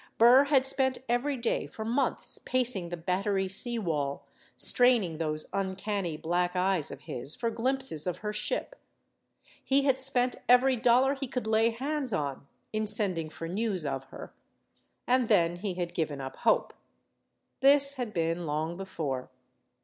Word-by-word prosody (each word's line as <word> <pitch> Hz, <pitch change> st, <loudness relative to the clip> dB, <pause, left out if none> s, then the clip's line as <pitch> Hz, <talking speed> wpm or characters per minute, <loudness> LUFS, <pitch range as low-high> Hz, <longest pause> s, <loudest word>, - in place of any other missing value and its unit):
Burr 245 Hz, +5 st, +7 dB
had 275 Hz, -2 st, +3 dB
spent 265 Hz, -1 st, +2 dB
every 250 Hz, +4 st, 0 dB
day 235 Hz, -1 st, -1 dB
for 220 Hz, -, -7 dB
months 245 Hz, +5 st, 0 dB
pacing 240 Hz, -9 st, -1 dB
the 175 Hz, -, -5 dB
Battery 190 Hz, +3 st, -1 dB
sea 235 Hz, +5 st, 0 dB
wall, 150 Hz, -9 st, -2 dB, 0.3 s
straining 230 Hz, -10 st, +2 dB
those 155 Hz, -1 st, -2 dB
uncanny 190 Hz, -3 st, -2 dB
black 175 Hz, +3 st, -1 dB
eyes 185 Hz, -3 st, +1 dB
of -, -, -9 dB
his 135 Hz, +5 st, -4 dB
for 230 Hz, -1 st, -2 dB
glimpses 255 Hz, -, 0 dB
of 180 Hz, -1 st, -2 dB
her 210 Hz, -, -2 dB
ship. 210 Hz, -, -2 dB, 0.9 s
He 275 Hz, +1 st, +2 dB
had 265 Hz, -2 st, +2 dB
spent 255 Hz, -2 st, 0 dB
every 255 Hz, +2 st, +5 dB
dollar 250 Hz, +3 st, +3 dB
he 270 Hz, -1 st, -5 dB
could 250 Hz, -1 st, -4 dB
lay 220 Hz, +1 st, +3 dB
hands 265 Hz, +1 st, -3 dB
on 140 Hz, -4 st, -3 dB, 0.3 s
in 215 Hz, 0 st, -1 dB
sending 190 Hz, -7 st, +1 dB
for 165 Hz, +1 st, -7 dB
news 190 Hz, -2 st, -2 dB
of 135 Hz, -1 st, -3 dB
her. -, -, -11 dB, 0.7 s
And 250 Hz, -1 st, +2 dB
then 175 Hz, -5 st, +3 dB
he 190 Hz, 0 st, -4 dB
had 175 Hz, -1 st, -4 dB
given 150 Hz, -4 st, -2 dB
up 135 Hz, -1 st, -6 dB
hope. -, -, +1 dB, 0.9 s
This 280 Hz, +1 st, +6 dB
had 245 Hz, -4 st, -3 dB
been 165 Hz, -1 st, -1 dB
long 155 Hz, +3 st, -2 dB
before. 155 Hz, -9 st, -4 dB
210 Hz, 155 wpm, -29 LUFS, 170-250 Hz, 0.9 s, Burr